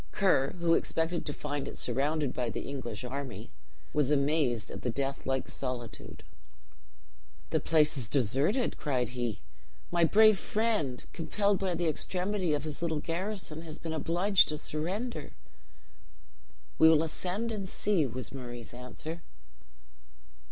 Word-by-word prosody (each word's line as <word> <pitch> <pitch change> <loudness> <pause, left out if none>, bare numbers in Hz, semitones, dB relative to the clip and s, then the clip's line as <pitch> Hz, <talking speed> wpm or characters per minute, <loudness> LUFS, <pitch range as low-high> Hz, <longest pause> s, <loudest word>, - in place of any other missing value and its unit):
Ker, 160 -9 +3
who 170 -1 +3
expected 165 +1 0
to - - 0
find 145 -1 -3
it - - -6
surrounded 145 0 0
by 125 -2 -1
the - - -3
English 125 -5 -5
army, 125 - -5 0.4
was 145 -3 +2
amazed 140 -6 +2
at - - -6
the 125 - -1
death 135 +3 -2
like 130 -1 0
solitude. 120 -6 -5 1.3
"The - - +3
place 155 -2 +3
is 110 -5 -2
deserted," 140 - +2
cried 125 -6 0
he. 120 -3 -3 0.5
"My 170 -1 +3
brave 215 +4 +6
friend, 210 - 0
compelled 200 +4 +1
by 185 -3 0
the 170 0 0
extremity 180 +2 0
of 145 - -3
his 155 -1 -5
little 160 -3 0
garrison, 175 -1 -3
has 160 -2 -8
been 165 -1 -4
obliged 175 +5 +4
to 150 - -2
surrender." 170 - -3 1.5
"We 160 - +9
will 160 -1 +5
ascend 185 +8 -2
and 200 -4 -3
see," 185 -9 +1
was 130 +2 -6
Murray's 120 -3 -7
answer. 125 +7 -7
155 Hz, 140 wpm, -31 LUFS, 130-175 Hz, 1.5 s, We